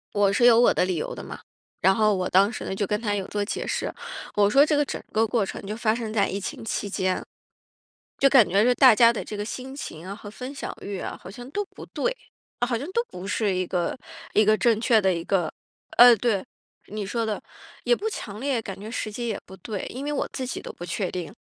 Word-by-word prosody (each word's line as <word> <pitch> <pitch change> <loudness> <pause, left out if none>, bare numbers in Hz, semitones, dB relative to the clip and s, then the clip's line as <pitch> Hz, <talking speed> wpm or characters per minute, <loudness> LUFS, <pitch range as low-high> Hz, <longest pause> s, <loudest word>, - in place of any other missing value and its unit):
我 200 -1 +3
是 240 - +2
有 235 -2 +7
我 240 - +6
的 - - +2
理 185 -2 -1
由 155 - -3
的 - - -8
嘛， - - -8 0.4
然 190 +2 +5
后 215 0 +3
我 185 -1 -1
当 195 +3 +5
时 235 - -6
呢， - - -3
就 200 +1 -1
跟 210 +2 0
她 210 -3 -1
有 195 -2 -2
做 205 -1 -1
解 205 - -4
释。 - - -2 0.4
我 205 -1 +4
说 275 +7 +6
这 305 - +1
个 290 - +3
整 - - -5
个 220 +1 +3
过 225 -1 +1
程 - - -6
就 210 +2 -4
发 220 -1 +1
生 225 -2 -4
在 205 -3 +2
疫 200 +2 -3
情 - - -6
期 210 -2 -2
间， 185 -2 -1 1.0
就 275 - +5
感 260 -6 +6
觉 200 +3 +3
是 250 +1 +4
大 255 -2 +7
家 230 +1 +7
的 230 - -4
这 210 - -6
个 205 - -3
心 255 +4 -6
情 170 - -7
啊 195 - -5
和 205 -1 -10
分 255 +6 -7
享 275 - -5
欲 200 -1 -5
啊， - - -5
好 - - -9
像 245 +5 -10
都 410 +7 -2
不 - - -12
对， - - -1 0.5
好 240 -2 -1
像 275 - -5
都 470 - +2
不 180 +2 -8
是 205 -1 0
一 185 0 -1
个， 175 +4 -1 0.4
一 215 - +5
个 215 +1 +4
正 230 -2 +3
确 230 -1 +4
的 190 -2 +2
一 170 -1 -4
个 180 -4 +1 0.5
呃， 245 0 +10
对， 210 -3 0 0.4
你 210 -1 -4
说 230 +3 -1
的。 215 -2 -3 0.4
也 485 - +4
不 440 - -2
强 210 - -6
烈， 265 -1 0
感 195 -3 -7
觉 215 +3 -8
时 225 -2 -3
机 235 +3 -4
也 215 - -3
不 190 - -11
对， 200 +2 -5
因 260 +3 -6
为 295 - -2
我 285 - -1
自 260 - -4
己 250 - -4
都 - - -8
不 175 - -9
确 180 +2 -2
定。 175 -4 -5
215 Hz, 275 characters per minute, -25 LUFS, 195-245 Hz, 1.0 s, 呃